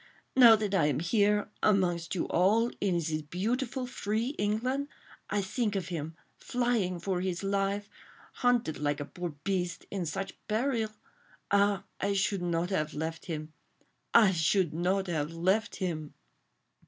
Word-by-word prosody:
now 240 Hz, -3 st, +9 dB
that 210 Hz, -2 st, -2 dB
I 165 Hz, -6 st, +4 dB
am 145 Hz, -2 st, 0 dB
here—amongst 195 Hz, -2 st, +1 dB
you 175 Hz, -, 0 dB
all—in 205 Hz, 0 st, +2 dB
this 160 Hz, -2 st, -1 dB
beautiful, 240 Hz, -, -2 dB
free 225 Hz, -1 st, -2 dB
England—I 220 Hz, -1 st, -2 dB
think 210 Hz, +1 st, -1 dB
of 190 Hz, -3 st, -2 dB
him, 160 Hz, -2 st, -4 dB, 0.2 s
flying 235 Hz, -8 st, 0 dB
for 180 Hz, 0 st, -1 dB
his 185 Hz, 0 st, -2 dB
life, 200 Hz, +1 st, 0 dB, 0.5 s
hunted 245 Hz, -10 st, +2 dB
like 145 Hz, 0 st, 0 dB
a 145 Hz, -, -3 dB
poor 175 Hz, +3 st, -5 dB
beast... 180 Hz, -3 st, -2 dB
in 185 Hz, -4 st, -2 dB
such 195 Hz, +4 st, -4 dB
peril.... 225 Hz, 0 st, 0 dB, 0.6 s
Ah! 200 Hz, -1 st, +3 dB, 0.2 s
I 200 Hz, +1 st, 0 dB
should 195 Hz, -1 st, +1 dB
not 175 Hz, +1 st, -1 dB
have 155 Hz, -4 st, -1 dB
left 160 Hz, +2 st, -4 dB
him... 155 Hz, -2 st, -5 dB, 0.6 s
I 215 Hz, -4 st, +7 dB
should 170 Hz, 0 st, +2 dB
not 185 Hz, +4 st, +1 dB
have 160 Hz, -3 st, -2 dB
left 190 Hz, +7 st, +1 dB
him! 160 Hz, -5 st, -4 dB
195 Hz, 140 wpm, -30 LUFS, 170-215 Hz, 0.6 s, now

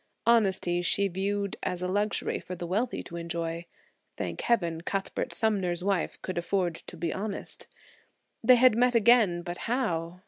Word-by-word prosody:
Honesty 190 Hz, -6 st, +3 dB
she 200 Hz, +3 st, +3 dB
viewed 200 Hz, +2 st, -2 dB
as 180 Hz, 0 st, -2 dB
a -, -, 0 dB
luxury 205 Hz, +2 st, 0 dB
for 180 Hz, -, -7 dB
the 175 Hz, -, -6 dB
wealthy 215 Hz, +8 st, -1 dB
to 170 Hz, -, -8 dB
enjoy. 170 Hz, 0 st, -4 dB, 0.5 s
Thank -, -, -4 dB
heaven, 170 Hz, -9 st, +1 dB
Cuthbert 195 Hz, +2 st, -3 dB
Sumner's 190 Hz, -6 st, 0 dB
wife 195 Hz, -4 st, -1 dB
could 185 Hz, -2 st, -2 dB
afford 180 Hz, 0 st, 0 dB
to -, -, -8 dB
be 170 Hz, -3 st, -2 dB
honest. 200 Hz, +1 st, -5 dB, 0.8 s
They 255 Hz, -, +7 dB
had 250 Hz, -1 st, +5 dB
met 245 Hz, +1 st, +3 dB
again, 215 Hz, -6 st, +4 dB
but 175 Hz, 0 st, -5 dB
how? 180 Hz, -9 st, -1 dB
190 Hz, 160 wpm, -28 LUFS, 175-215 Hz, 0.8 s, They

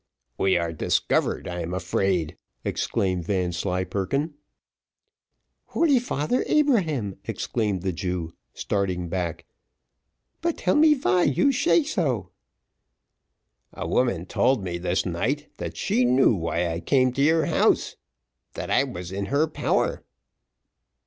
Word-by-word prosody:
"We 95 Hz, -1 st, +2 dB
are 85 Hz, -1 st, -2 dB
discovered, 80 Hz, -, 0 dB
I'm 90 Hz, 0 st, -4 dB
afraid!" 95 Hz, -3 st, 0 dB, 0.3 s
exclaimed 90 Hz, -3 st, -1 dB
Vanslyperken. 95 Hz, -, -1 dB, 1.3 s
"Holy 295 Hz, -6 st, +3 dB
father 235 Hz, -, -1 dB
Abraham!" 165 Hz, -, +1 dB
exclaimed 105 Hz, -6 st, -2 dB
the 95 Hz, -, 0 dB
Jew, 90 Hz, -1 st, -3 dB, 0.2 s
starting 90 Hz, -3 st, -2 dB
back. 85 Hz, -2 st, -3 dB, 1.0 s
"But 335 Hz, 0 st, -1 dB
tell -, -, +1 dB
me 305 Hz, 0 st, +6 dB
vy 185 Hz, -10 st, +2 dB
you 145 Hz, -, +3 dB
shay 320 Hz, +5 st, +3 dB
sho." 155 Hz, -, -1 dB, 1.4 s
"A -, -, -5 dB
woman 120 Hz, -9 st, +1 dB
told 125 Hz, +3 st, +1 dB
me 85 Hz, -2 st, -3 dB
this 90 Hz, -, 0 dB
night -, -, -2 dB
that -, -, -6 dB
she 125 Hz, -, +1 dB
knew 125 Hz, 0 st, +4 dB
why 85 Hz, -1 st, -1 dB
I 85 Hz, 0 st, -3 dB
came 130 Hz, +3 st, +2 dB
to 140 Hz, -, -1 dB
your 160 Hz, +2 st, +4 dB
house -, -, +2 dB, 0.6 s
that -, -, -5 dB
I -, -, +4 dB
was 90 Hz, 0 st, -6 dB
in 100 Hz, +1 st, -3 dB
her 145 Hz, +3 st, +2 dB
power." 155 Hz, -, -1 dB
100 Hz, 120 wpm, -25 LUFS, -, 1.4 s, me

